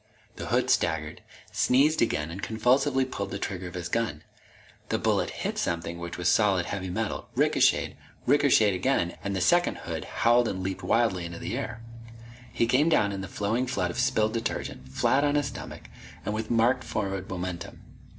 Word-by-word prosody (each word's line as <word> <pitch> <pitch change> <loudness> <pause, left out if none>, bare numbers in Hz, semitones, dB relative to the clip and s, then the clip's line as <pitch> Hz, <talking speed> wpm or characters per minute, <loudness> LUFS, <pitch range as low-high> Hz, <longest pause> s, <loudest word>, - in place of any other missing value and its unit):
The - - -5
hood - - +2
staggered, 80 -2 0 0.3
sneezed 145 +5 +3
again, 80 -9 0
and 95 +4 -6
convulsively 130 +4 +2
pulled 130 - -4
the - - -4
trigger 95 -1 -4
of 90 - -9
his 90 -1 -4
gun. 115 +3 -2 0.7
The - - +1
bullet - - +1
hit - - -3
something 85 0 -2
which 85 0 -6
was 90 - -1
solid 95 -5 +3
heavy 95 -1 -4
metal, 110 +4 -3
ricocheted, - - +3 0.3
ricocheted 135 -7 +4
again 90 -2 0
and 100 -1 -2
the 95 - -1
second 175 - +3
hood - - -4
howled 120 +1 +3
and 95 -3 -3
leaped 95 0 -3
wildly 115 -7 +1
into 85 0 -6
the 105 - -4
air. 125 -3 -5 0.7
He - - +1
came 130 +7 +3
down 105 -10 +3
in 100 -1 -4
the 95 - -5
flowing 110 +7 -1
flood 90 -9 -1
of - - -5
spilled 110 0 +2
detergent, 115 - -4
flat 135 - +2
on 145 0 +2
his 145 -1 +2
stomach, - - -8 0.4
and 105 - -1
with 110 0 -3
marked 120 +2 +3
forward 95 -2 -3
momentum. 90 -1 -5
105 Hz, 180 wpm, -27 LUFS, 90-120 Hz, 0.7 s, ricocheted